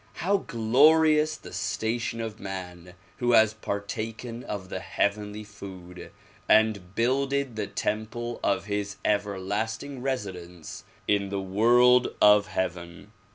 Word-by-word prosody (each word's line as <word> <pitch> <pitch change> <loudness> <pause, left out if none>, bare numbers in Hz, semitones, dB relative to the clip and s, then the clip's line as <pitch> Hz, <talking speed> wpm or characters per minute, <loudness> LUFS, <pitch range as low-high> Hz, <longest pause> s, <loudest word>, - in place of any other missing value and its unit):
How 195 +4 +1
glorious 155 - +4
the - - -12
station 115 +1 -2
of 110 -1 -6
man 90 -2 -7 0.2
who 120 -1 +1
has 110 -1 +6
partaken 110 +3 -5
of 95 -3 -6
the 95 - -4
heavenly 105 +2 -2
food 95 -4 -10 0.4
and 105 -4 +3
builded 135 +1 0
the 105 -2 -3
temple 115 +3 -3
of 95 - +1
his 100 -1 -3
everlasting 105 +6 -2
resi 125 -7 -2
dence 85 -2 -10 0.2
in 100 -1 +1
the 100 0 -2
world 120 +6 +4
of 105 0 +6
heaven! 90 +1 -4
105 Hz, 120 wpm, -27 LUFS, 95-120 Hz, 0.4 s, has